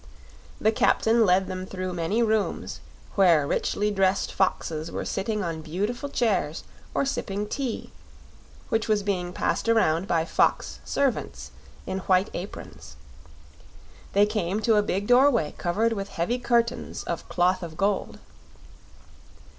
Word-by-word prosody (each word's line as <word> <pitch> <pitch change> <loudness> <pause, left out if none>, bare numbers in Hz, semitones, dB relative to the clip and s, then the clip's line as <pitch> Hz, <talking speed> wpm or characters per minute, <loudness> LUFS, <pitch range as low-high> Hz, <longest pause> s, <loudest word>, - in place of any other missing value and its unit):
The 220 - +3
captain 225 0 +3
led 185 +1 +4
them 185 0 -5
through 185 -1 -4
many 175 +7 0
rooms, 220 -2 -1 0.3
where 170 -7 +5
richly 210 +8 0
dressed 195 -1 +1
foxes 165 -4 -1
were - - -4
sitting 210 +1 -2
on 165 -2 -3
beautiful 205 - -3
chairs 205 - 0 0.3
or - - +2
sipping 205 -6 -2
tea, 260 +1 -4 0.8
which 225 0 0
was 210 -2 +2
being 180 -3 -1
passed 230 - -1
around 190 -6 +3
by 165 -3 +1
fox - - +1
servants 70 - -2 0.3
in 190 - -3
white 185 +1 +2
aprons. 70 - -8 1.2
They 205 +1 +5
came 205 -2 -1
to 225 0 +3
a - - +5
big 200 -1 -2
doorway 245 - +4
covered 220 +6 +1
with 200 -2 -4
heavy 200 +10 -1
curtains 235 -1 0
of - - -5
cloth 180 +1 +2
of 165 -3 -7
gold. 200 +1 0
195 Hz, 135 wpm, -26 LUFS, 175-220 Hz, 1.2 s, where